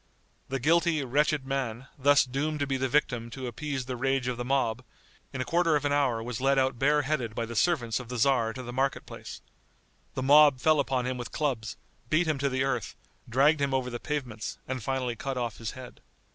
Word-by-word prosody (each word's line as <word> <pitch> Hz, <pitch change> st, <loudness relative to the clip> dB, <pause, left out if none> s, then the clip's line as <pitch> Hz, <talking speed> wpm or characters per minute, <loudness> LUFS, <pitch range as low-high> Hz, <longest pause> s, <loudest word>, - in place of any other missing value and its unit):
The 135 Hz, -, -2 dB
guilty, 165 Hz, +2 st, +2 dB
wretched 145 Hz, +2 st, +1 dB
man, 135 Hz, -3 st, -3 dB
thus 145 Hz, +1 st, +4 dB
doomed 145 Hz, +4 st, -2 dB
to -, -, +2 dB
be 135 Hz, -1 st, -1 dB
the 130 Hz, 0 st, -1 dB
victim 125 Hz, -4 st, 0 dB
to 130 Hz, +2 st, -7 dB
appease 135 Hz, +2 st, -4 dB
the 130 Hz, 0 st, -4 dB
rage 135 Hz, +1 st, 0 dB
of 125 Hz, -, -1 dB
the 120 Hz, -, -4 dB
mob, 125 Hz, -2 st, 0 dB, 0.5 s
in 135 Hz, -, -4 dB
a -, -, -2 dB
quarter 170 Hz, -2 st, +2 dB
of 145 Hz, -1 st, 0 dB
an 145 Hz, -, +1 dB
hour 130 Hz, -6 st, +1 dB
was 120 Hz, +1 st, -5 dB
led 135 Hz, +1 st, +3 dB
out 130 Hz, -2 st, +1 dB
bareheaded 145 Hz, -5 st, +1 dB
by 115 Hz, -, -1 dB
the 120 Hz, +1 st, -7 dB
servants 120 Hz, -6 st, +1 dB
of 125 Hz, -2 st, -9 dB
the 125 Hz, -, -4 dB
tzar 120 Hz, -2 st, +3 dB
to 130 Hz, -, -7 dB
the 120 Hz, 0 st, -7 dB
market 135 Hz, +2 st, 0 dB
place. -, -, -9 dB, 0.7 s
The 130 Hz, -, -2 dB
mob 145 Hz, -1 st, +6 dB
fell 155 Hz, +3 st, +3 dB
upon 130 Hz, -3 st, 0 dB
him 125 Hz, 0 st, -2 dB
with 120 Hz, -, -6 dB
clubs, 125 Hz, -7 st, -2 dB, 0.3 s
beat 160 Hz, +3 st, +3 dB
him 155 Hz, -3 st, 0 dB
to 140 Hz, 0 st, +1 dB
the 130 Hz, 0 st, 0 dB
earth, 130 Hz, -5 st, -2 dB, 0.3 s
dragged 145 Hz, +5 st, +4 dB
him 140 Hz, -1 st, +1 dB
over 125 Hz, -1 st, -1 dB
the 120 Hz, -, -4 dB
pavements, 125 Hz, -8 st, -4 dB
and 130 Hz, -1 st, -3 dB
finally 130 Hz, 0 st, -2 dB
cut 130 Hz, +4 st, -4 dB
off 120 Hz, -3 st, -3 dB
his 115 Hz, -2 st, -5 dB
head. 130 Hz, -1 st, -11 dB
130 Hz, 220 wpm, -28 LUFS, 120-145 Hz, 0.7 s, mob